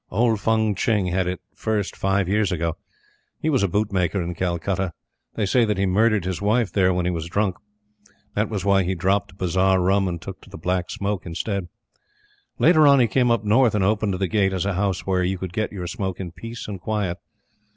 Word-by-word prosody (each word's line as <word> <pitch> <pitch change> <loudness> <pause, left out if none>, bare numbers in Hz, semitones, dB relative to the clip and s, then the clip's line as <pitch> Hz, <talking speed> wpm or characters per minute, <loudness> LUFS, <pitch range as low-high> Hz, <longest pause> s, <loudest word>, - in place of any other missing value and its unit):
Old 110 +2 +2
Fung 110 0 +2
Tching 100 -4 0
had 90 0 0
it 90 0 -3
first 105 -3 -2
five 95 -1 0
years 105 +1 +1
ago. 85 -2 -1 0.6
He 155 - 0
was 135 - +2
a 100 - +3
boot 105 +3 0
maker 95 0 0
in 90 0 -3
Calcutta. 90 +1 -2 0.4
They 110 - 0
say 120 +5 +3
that 105 -3 0
he 95 - +1
murdered 105 +1 +2
his 95 0 -3
wife 105 +1 +1
there 95 -2 +3
when 90 -1 0
he 90 - +1
was 85 -2 -4
drunk. 100 0 0 0.8
That 105 +1 0
was 100 -4 -3
why 100 -1 +4
he 95 +1 -1
dropped 95 +2 0
bazar 95 +1 +2
rum 95 +2 +2
and 85 -2 -3
took 90 +1 -9
to - - -16
the - - -9
Black 90 -1 -1
Smoke 100 -2 -3
instead. 95 +2 -3 0.9
Later 155 -2 +5
on, 140 -1 +6
he 125 - +5
came 120 +3 +2
up 115 -2 +2
north 110 +2 +3
and 100 - +2
opened 105 0 +1
the 95 +1 -1
Gate 95 -1 +1
as 95 0 -1
a 100 - 0
house 95 0 -1
where 95 -1 +1
you 95 +1 -1
could 90 -1 -6
get 110 +2 -1
your 95 -4 -5
smoke 95 +1 -4
in 90 -3 -5
peace 115 +6 -8
and 100 -4 -6
quiet. 100 -5 -2
95 Hz, 220 wpm, -23 LUFS, 90-105 Hz, 0.9 s, on